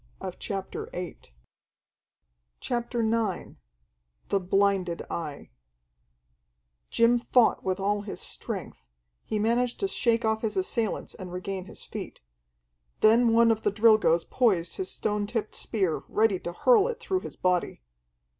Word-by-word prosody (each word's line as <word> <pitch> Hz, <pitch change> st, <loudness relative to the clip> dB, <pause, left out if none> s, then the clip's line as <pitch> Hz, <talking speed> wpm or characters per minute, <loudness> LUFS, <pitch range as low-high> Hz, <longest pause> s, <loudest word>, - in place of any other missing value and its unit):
CHAPTER 195 Hz, -2 st, -5 dB
IX 180 Hz, -1 st, -6 dB, 1.4 s
The 190 Hz, -, -3 dB
Blinded 190 Hz, -2 st, +1 dB
Eye 150 Hz, -, -5 dB, 1.4 s
Jim 235 Hz, +1 st, +4 dB
fought 240 Hz, 0 st, +3 dB
with 185 Hz, 0 st, -1 dB
all 205 Hz, +1 st, 0 dB
his 205 Hz, -1 st, -6 dB
strength; -, -, -5 dB, 0.4 s
he 215 Hz, -, -2 dB
managed 235 Hz, +3 st, +1 dB
to 395 Hz, -, +1 dB
shake 235 Hz, -11 st, +1 dB
off 220 Hz, 0 st, +1 dB
his 210 Hz, -3 st, -2 dB
assailants 215 Hz, +3 st, -1 dB
and 185 Hz, -1 st, -9 dB
regain 185 Hz, +1 st, -4 dB
his -, -, -10 dB
feet. -, -, -8 dB, 0.8 s
Then 230 Hz, +2 st, +5 dB
one 230 Hz, 0 st, +5 dB
of 220 Hz, -1 st, 0 dB
the 205 Hz, -, +1 dB
Drilgoes 210 Hz, -6 st, +4 dB
poised 195 Hz, -9 st, +1 dB
his 380 Hz, -, -3 dB
stone 210 Hz, -1 st, -1 dB
tipped 220 Hz, -1 st, -3 dB
spear, 190 Hz, -8 st, -1 dB
ready 215 Hz, -4 st, +2 dB
to 175 Hz, -, -5 dB
hurl 445 Hz, -, +4 dB
it 480 Hz, -2 st, -4 dB
through 375 Hz, -1 st, -1 dB
his -, -, -9 dB
body. 180 Hz, -, 0 dB
210 Hz, 125 wpm, -27 LUFS, 180-230 Hz, 1.4 s, Then